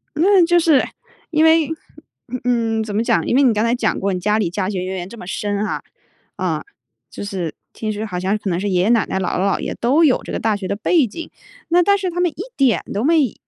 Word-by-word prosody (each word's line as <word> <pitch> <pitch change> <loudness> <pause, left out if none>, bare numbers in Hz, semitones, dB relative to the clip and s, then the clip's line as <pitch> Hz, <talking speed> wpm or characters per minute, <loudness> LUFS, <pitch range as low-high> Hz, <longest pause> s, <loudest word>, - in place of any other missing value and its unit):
嗯， 365 +3 +5
就 345 +1 +4
是 320 -5 +4 0.5
因 310 -1 +2
为， 320 -1 +4 0.7
嗯， 230 -2 +1
怎 210 -2 -5
么 220 - +1
讲？ - - +1
因 - - +1
为 280 - +5
你 250 -4 +4
刚 215 0 0
才 230 +1 +2
讲 245 - 0
过 195 0 -1
你 180 - -2
家 210 +4 +1
里 195 -6 0
家 185 +1 -2
学 190 -3 -3
渊 185 +1 -4
源 180 0 -6
这 235 - -11
么 180 - -10
深 205 +1 -2
哈， - - -3 0.5
嗯， - - -2 0.5
就 - - -7
是 185 -6 -4 0.2
听 215 -1 -3
说 210 +1 -4
好 180 -4 -4
像 190 +3 0
可 205 - -4
能 175 -1 0
是 200 +2 -2
爷 180 -2 +2
爷 195 - +2
奶 230 -3 +3
奶 - - -2
姥 185 - -1
姥 - - +1 0.2
姥 - - -9
爷 - - -4
都 275 +8 +3
有 280 -5 +3
这 - - -7
个 - - -2
大 220 -1 +1
学 195 -2 -5
的 200 - -1
背 285 - +2
景， 330 +11 -8 0.4
那 350 +1 +4
但 400 +2 +4
是 385 -2 -2
他 350 0 -4
们 355 -2 +2
一 365 - -7
点 265 -5 +2
都 205 - -1
没 295 - +3
220 Hz, 280 characters per minute, -19 LUFS, 200-310 Hz, 0.7 s, 嗯